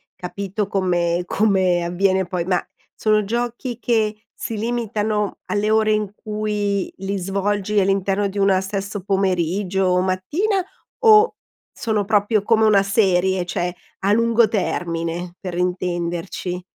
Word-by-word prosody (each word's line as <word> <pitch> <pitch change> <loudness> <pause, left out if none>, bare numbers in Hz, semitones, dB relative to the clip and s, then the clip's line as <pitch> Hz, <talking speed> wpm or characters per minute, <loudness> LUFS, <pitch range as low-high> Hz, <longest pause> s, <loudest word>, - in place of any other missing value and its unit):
capito 195 +2 -4
come 175 -3 0
come 185 -3 +2
avviene 190 +2 +1
poi 175 -1 -3
ma 180 -1 0 0.3
sono 215 -1 +2
giochi 240 +2 -3
che 220 -3 +1 0.2
si 225 - -5
limitano 215 -2 -1
alle 210 0 0
ore 220 0 +3
in 210 -2 0
cui 210 -2 -2
li 195 +1 -3
svolgi, 200 +2 0
all'interno 195 +1 +1
di 200 - -8
una 195 -1 +3
stesso 200 +1 -4
pomeriggio 190 0 0
o 180 0 +3
mattina, 300 - 0 0.4
o 440 0 +6 0.4
sono 215 -3 -1
proprio 210 0 +2
come 220 0 +3
una 200 -2 +5
serie, 190 -3 +2
cioè 175 0 -2 0.2
a 195 +1 +1
lungo 230 0 +4
termine? 175 -3 -2
Per 185 -2 -6
intenderci. 180 0 -2
195 Hz, 130 wpm, -21 LUFS, 185-215 Hz, 0.4 s, o